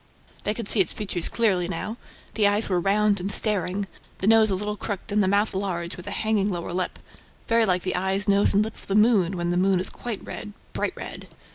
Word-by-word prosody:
They 210 - 0
could 230 -3 -4
see 215 - +4
its 185 - +3
features 195 -5 0
clearly 190 -7 +1
now. 195 +6 -4 0.4
The 210 -2 +3
eyes 205 +2 +2
were 180 -2 +1
round 205 +2 +2
and 190 +3 -2
staring, 200 -2 +2 0.3
the - - -4
nose 220 0 +5
a 195 - +1
little 210 +2 -3
crooked 205 0 -5
and 210 +1 +2
the - - +1
mouth 205 +3 +1
large, 180 -3 -3
with 180 - -11
a - - -3
hanging 210 -2 +1
lower 175 -2 -4
lip, 185 0 -2 0.5
very 230 -1 +3
like 180 -1 +1
the 185 - -1
eyes, 190 +3 0
nose 200 0 +3
and 205 - +4
lip 220 - -5
of - - -16
the 195 - -1
moon, 205 -5 +3
when 175 0 -1
the 175 - 0
moon 190 0 +2
is 185 - +2
quite 235 -4 -6
red, 210 - -7 0.2
bright - - -2
red. - - -8
200 Hz, 235 wpm, -24 LUFS, 185-210 Hz, 0.5 s, nose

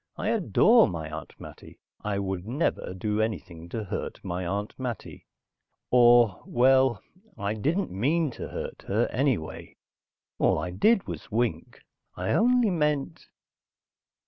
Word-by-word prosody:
I 210 - -2
adore 225 +2 +4
my 80 -3 -5
Aunt 80 -1 -8
Mattie. - - -12 0.3
I 105 -1 -1
would 95 -1 -3
never 125 - -1
do 105 +3 -1
anything 85 -6 -4
to 110 +4 -4
hurt 100 - -5
my 90 0 -3
Aunt 100 +3 -3
Mattie. 125 -3 -6 0.6
Or, 120 -4 +5
well, 130 -3 +3 0.3
I 100 +1 -2
didn't 155 - -1
mean 145 - +1
to - - -7
hurt - - -6
her, 110 +4 +2
anyway. 125 - -2 0.6
All - - +3
I 85 +3 -3
did 205 - +3
was - - -7
wink. 110 -7 -2 0.4
I 90 +1 -2
only 245 -1 +3
meant.... 150 - -1
110 Hz, 135 wpm, -27 LUFS, 95-140 Hz, 0.6 s, Or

